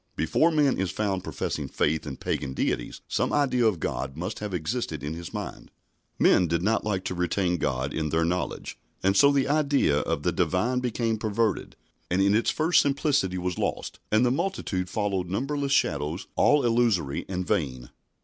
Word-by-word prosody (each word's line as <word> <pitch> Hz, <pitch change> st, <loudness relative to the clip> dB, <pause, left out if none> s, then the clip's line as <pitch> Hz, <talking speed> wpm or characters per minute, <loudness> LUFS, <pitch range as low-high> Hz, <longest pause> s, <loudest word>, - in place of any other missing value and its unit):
Before 165 Hz, -, +2 dB
man 150 Hz, -, +2 dB
is 95 Hz, -1 st, 0 dB
found 100 Hz, -3 st, -2 dB
professing -, -, -3 dB
faith 80 Hz, 0 st, 0 dB
in 65 Hz, -, -5 dB
pagan 65 Hz, -, -3 dB
deities -, -, -2 dB
some -, -, 0 dB
idea 130 Hz, -5 st, +2 dB
of 100 Hz, -6 st, 0 dB
God 65 Hz, -2 st, -3 dB
must 90 Hz, +6 st, -4 dB
have 105 Hz, -1 st, -4 dB
existed 85 Hz, -, -3 dB
in 75 Hz, +2 st, -3 dB
his 85 Hz, +1 st, -7 dB
mind. -, -, -6 dB, 0.5 s
Men 90 Hz, -, +4 dB
did 85 Hz, +2 st, 0 dB
not 110 Hz, +3 st, +1 dB
like 95 Hz, -3 st, -1 dB
to -, -, -2 dB
retain 90 Hz, 0 st, 0 dB
God 65 Hz, -2 st, -1 dB
in 80 Hz, -1 st, -1 dB
their 80 Hz, +2 st, +1 dB
knowledge, 90 Hz, -7 st, -3 dB, 0.2 s
and 95 Hz, +1 st, +3 dB
so 140 Hz, +8 st, +6 dB
the 140 Hz, -2 st, +2 dB
idea 140 Hz, -, +2 dB
of -, -, -2 dB
the -, -, +2 dB
Divine 120 Hz, +8 st, +1 dB
became 115 Hz, -2 st, -1 dB
perverted, 110 Hz, 0 st, -1 dB, 0.3 s
and 90 Hz, -, +1 dB
in 100 Hz, +1 st, +4 dB
its 115 Hz, -, +2 dB
first 160 Hz, +3 st, +3 dB
simplicity 140 Hz, -, +1 dB
was 90 Hz, -1 st, -3 dB
lost, -, -, -3 dB
and 110 Hz, +3 st, +4 dB
the 120 Hz, -, +3 dB
multitude 130 Hz, -, -2 dB
followed 100 Hz, -4 st, -1 dB
numberless 140 Hz, +7 st, -2 dB
shadows 75 Hz, -, 0 dB
all 145 Hz, -3 st, +4 dB
illusory 115 Hz, -, +1 dB
and 90 Hz, -1 st, -2 dB
vain. 65 Hz, -, -2 dB
95 Hz, 180 wpm, -26 LUFS, 85-125 Hz, 0.5 s, so